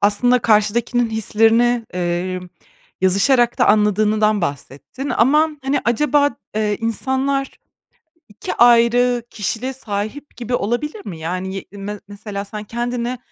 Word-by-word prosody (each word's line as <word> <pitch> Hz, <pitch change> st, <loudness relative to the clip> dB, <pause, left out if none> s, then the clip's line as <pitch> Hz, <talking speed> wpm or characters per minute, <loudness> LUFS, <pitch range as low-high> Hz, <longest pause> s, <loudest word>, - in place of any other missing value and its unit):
aslında 245 Hz, +5 st, +3 dB
karşıdakinin 230 Hz, +2 st, +1 dB
hislerini, 225 Hz, +2 st, +2 dB
eee, 180 Hz, +1 st, -2 dB, 0.6 s
yazışarak 230 Hz, +7 st, +3 dB
da -, -, +4 dB
anladığından 210 Hz, 0 st, +3 dB
bahsettin 145 Hz, -, -5 dB
ama, 300 Hz, +7 st, +3 dB
hani, 270 Hz, +2 st, 0 dB
acaba, 285 Hz, +4 st, +2 dB, 0.3 s
eee, 210 Hz, -1 st, 0 dB
insanlar 265 Hz, +4 st, -1 dB, 0.8 s
2 210 Hz, -, -6 dB
ayrı 240 Hz, +1 st, +4 dB
kişiliğe 225 Hz, +5 st, -3 dB
sahip 220 Hz, +4 st, -6 dB
gibi 245 Hz, 0 st, -4 dB
olabilir 300 Hz, -, -2 dB
mi? 165 Hz, -4 st, -6 dB
Yani, 185 Hz, +4 st, -4 dB
ye 195 Hz, -, -5 dB
me 205 Hz, +1 st, -7 dB
mesela, 205 Hz, 0 st, -6 dB
sen 210 Hz, +1 st, -7 dB
kendini 240 Hz, +2 st, -3 dB
225 Hz, 115 wpm, -19 LUFS, 205-245 Hz, 0.8 s, da